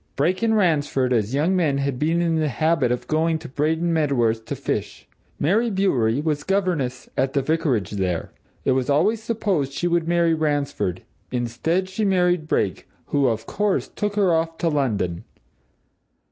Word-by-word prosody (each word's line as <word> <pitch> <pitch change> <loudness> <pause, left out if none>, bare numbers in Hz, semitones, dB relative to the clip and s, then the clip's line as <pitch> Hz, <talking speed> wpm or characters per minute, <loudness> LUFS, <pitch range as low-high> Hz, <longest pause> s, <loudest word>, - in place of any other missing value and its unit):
Brake 175 +8 +1
and 225 -1 +2
Ransford, 145 -8 +1
as 115 +2 0
young 165 +7 +2
men, 155 -6 +2
had 140 -2 -2
been 165 +3 +1
in 165 -1 +1
the 155 -1 +1
habit 150 -3 +1
of 125 0 -2
going 160 +1 +1
to 160 0 -9
Braden 160 +5 0
Medworth 120 -8 +1
to - - -4
fish; - - -4 0.3
Mary 215 +10 +2
Bewery 140 - +1
was 150 -2 -1
governess 180 -10 -1
at 135 +1 0
the 140 -2 +1
vicarage 140 - 0
there. 95 -4 -2 0.3
It - - +3
was 130 0 0
always 205 +10 +2
supposed 200 - -1
she 175 - -1
would 170 -1 +1
marry 170 -1 +3
Ransford; 145 - -1 0.3
instead, 125 +10 -1
she 190 +3 -3
married 180 -4 +2
Brake, - - -1 0.2
who, 140 -2 +2
of 110 -2 -1
course, 205 -1 0
took 205 -1 -3
her 195 -4 +3
off 165 0 0
to 170 - 0
London. 105 - -1
155 Hz, 170 wpm, -23 LUFS, 130-175 Hz, 0.3 s, It